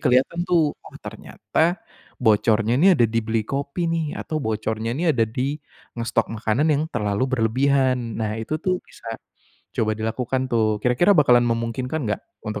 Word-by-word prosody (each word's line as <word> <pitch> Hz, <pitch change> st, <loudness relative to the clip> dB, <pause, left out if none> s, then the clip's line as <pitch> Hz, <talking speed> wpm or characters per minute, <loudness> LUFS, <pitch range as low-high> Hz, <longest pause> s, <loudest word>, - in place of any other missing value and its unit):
kelihatan 130 Hz, +7 st, +2 dB
tuh, 165 Hz, -4 st, +3 dB
"Oh, -, -, -13 dB
ternyata 170 Hz, +3 st, -1 dB, 0.5 s
bocornya 110 Hz, +1 st, +3 dB
nih 185 Hz, +1 st, +6 dB
ada 120 Hz, -, +4 dB
di 115 Hz, +1 st, 0 dB
beli 110 Hz, 0 st, -1 dB
kopi 140 Hz, -, -3 dB
nih." 165 Hz, -2 st, 0 dB
Atau, 155 Hz, -, -3 dB
bocornya 110 Hz, +1 st, -2 dB
ini 165 Hz, +4 st, +1 dB
ada 115 Hz, -5 st, +2 dB
di 135 Hz, +6 st, -2 dB, 0.4 s
ngestok 115 Hz, -1 st, 0 dB
makanan 115 Hz, +7 st, 0 dB
yang 150 Hz, +1 st, +1 dB
terlalu 105 Hz, 0 st, 0 dB
berlebihan. 130 Hz, 0 st, +1 dB
Nah, 110 Hz, 0 st, -2 dB
itu 150 Hz, +8 st, -2 dB
tuh 185 Hz, -1 st, +1 dB
bisa 115 Hz, -1 st, -8 dB, 0.6 s
coba 110 Hz, -1 st, +1 dB
dilakukan 125 Hz, +4 st, -2 dB
tuh. 110 Hz, -2 st, +2 dB
Kira-kira 125 Hz, +11 st, +4 dB
bakalan 125 Hz, -5 st, +5 dB
memungkinkan 115 Hz, +6 st, -2 dB
nggak 105 Hz, -, -1 dB, 0.2 s
untuk 105 Hz, -1 st, -4 dB
120 Hz, 155 wpm, -23 LUFS, 110-140 Hz, 0.6 s, nih